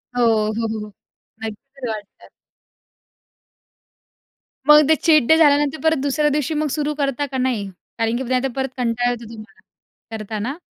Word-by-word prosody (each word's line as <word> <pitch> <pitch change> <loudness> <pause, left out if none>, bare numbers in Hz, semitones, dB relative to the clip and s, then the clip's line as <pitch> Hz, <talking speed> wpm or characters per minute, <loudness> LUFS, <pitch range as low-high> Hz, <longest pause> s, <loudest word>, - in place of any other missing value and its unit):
हो, 245 - +1
हो, 220 0 +1
हो, 220 0 -4
हो. 210 - -13 0.5
नक्की 255 +4 -7
वाटत. 210 -2 -8 2.4
मग 300 -1 +7
ते 315 - +6
चीट 310 -3 +4
डे 320 - +6
झाल्यानंतर 295 -1 +3
परत 320 0 +3
दुसऱ्या 295 +1 +1
दिवशी 300 +1 -1
मग 305 0 0
सुरू 300 -1 -1
करता 280 -1 -1
का 265 -1 -5
नाही? 245 -6 -1 0.3
कारण 230 +1 0
की 260 - -3
नाही 255 0 0
तर - - +1
परत 265 0 -1
कंटाळा 245 0 0
येतो 235 -2 -7
तुम्हाला 215 -1 -13 0.6
करताना? 220 +7 -4
260 Hz, 155 wpm, -20 LUFS, 225-295 Hz, 2.4 s, मग